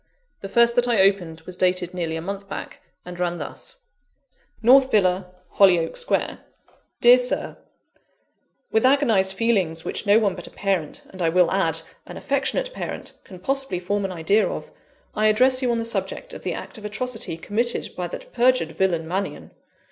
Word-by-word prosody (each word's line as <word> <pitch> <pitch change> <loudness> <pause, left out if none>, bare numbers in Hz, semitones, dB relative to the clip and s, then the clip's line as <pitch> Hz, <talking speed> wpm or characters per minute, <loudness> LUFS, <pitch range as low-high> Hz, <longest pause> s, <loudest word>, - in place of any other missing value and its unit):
The 195 - -7
first 235 +3 +4
that 245 0 +3
I 235 -4 +2
opened 180 -5 +1
was 185 - -10
dated 180 -1 0
nearly 170 -3 -3
a 160 - -5
month 200 +2 -6
back, - - -7 0.2
and 180 0 -9
ran 175 -1 -1
thus: - - -8 0.9
"North 260 +3 +6
Villa, 185 -4 +2 0.3
Hollyoake 180 -4 +4
Square. 485 - -1 0.6
"DEAR 245 +1 +8
SIR, 250 0 -2 1.1
"With 220 - +2
agonised 235 -8 +3
feelings 190 -7 0
which - - -4
no 205 +2 +6
one 210 -4 +2
but 175 - -8
a - - -10
parent, 190 -7 -2
and 190 - -9
I 165 - +2
will 180 +1 +3
add, 165 -4 +1 0.3
an - - -9
affectionate 280 - -1
parent, - - -6
can 185 - -12
possibly 270 -1 -2
form 200 +3 -2
an 195 - -2
idea 185 +5 +2
of, - - -6 0.4
I 215 0 +2
address 255 +5 +4
you 250 - 0
on 235 - +1
the 230 - -2
subject - - -2
of - - -8
the - - -3
act - - -8
of 210 - -11
atrocity 220 -4 -3
committed 230 +8 -1
by 180 -1 -3
that - - -9
perjured 245 -9 +2
villain, 170 -1 0
Mannion. 190 +4 -4
200 Hz, 180 wpm, -23 LUFS, 180-240 Hz, 1.1 s, DEAR